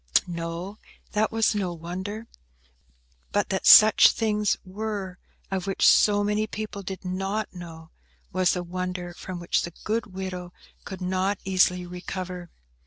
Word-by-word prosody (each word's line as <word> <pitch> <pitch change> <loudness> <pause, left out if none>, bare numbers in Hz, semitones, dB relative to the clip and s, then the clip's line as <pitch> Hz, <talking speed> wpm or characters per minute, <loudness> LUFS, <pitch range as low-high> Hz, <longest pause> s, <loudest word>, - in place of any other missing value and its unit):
No, 170 +3 -5 0.3
that 215 +1 +1
was 225 0 +2
no 190 -4 -2
wonder; 185 +6 -6 1.1
but - - 0
that - - -1
such 215 0 +9
things 210 -2 0
were, 195 -1 -5 0.3
of 190 0 -2
which 195 - +3
so 205 -1 +5
many 210 +1 0
people 215 -2 -6
did 190 0 -7
not 195 +4 -2
know, 165 -3 -10 0.4
was 185 0 +2
a 180 - -3
wonder 180 0 -4
from 180 0 -7
which 175 - 0
the 170 - -6
good 225 +1 -1
widow 185 -2 -6 0.3
could 190 -2 -7
not 185 +2 0
easily 180 -1 +2
recover. 180 0 -6
185 Hz, 140 wpm, -26 LUFS, 180-205 Hz, 1.1 s, such